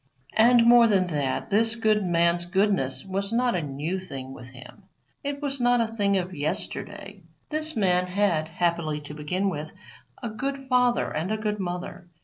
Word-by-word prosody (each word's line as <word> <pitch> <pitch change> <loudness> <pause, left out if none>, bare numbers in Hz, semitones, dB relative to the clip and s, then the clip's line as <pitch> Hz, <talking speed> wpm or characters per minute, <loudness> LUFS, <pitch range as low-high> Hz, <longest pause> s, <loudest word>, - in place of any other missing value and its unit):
And, 235 +2 +6
more 235 0 +7
than 195 -4 +3
that, 145 -1 -2
this 225 +3 +3
good 215 -2 +2
man's 175 0 +2
goodness 190 -7 0
was 195 +2 -3
not 245 +1 +1
a 175 - 0
new 150 +6 -3
thing 135 -8 -8
with 125 -2 -10
him 130 +9 -14 0.4
it 285 +1 -4
was 275 -1 -1
not 245 0 +3
a 230 - +3
thing 200 -3 +1
of 185 0 -3
yesterday. 150 -1 -5 0.3
This 310 +1 +3
man 180 -3 +2
had, 180 -5 +1
happily 170 -2 -1
to 150 0 -9
begin 165 +6 -2
with, 155 -4 -4 0.5
a 235 - -2
good 270 +5 -4
father 250 -2 +2
and 160 +6 -2
a 220 - 0
good 210 -1 -2
mother. 180 -1 -5
190 Hz, 175 wpm, -26 LUFS, 165-230 Hz, 0.5 s, more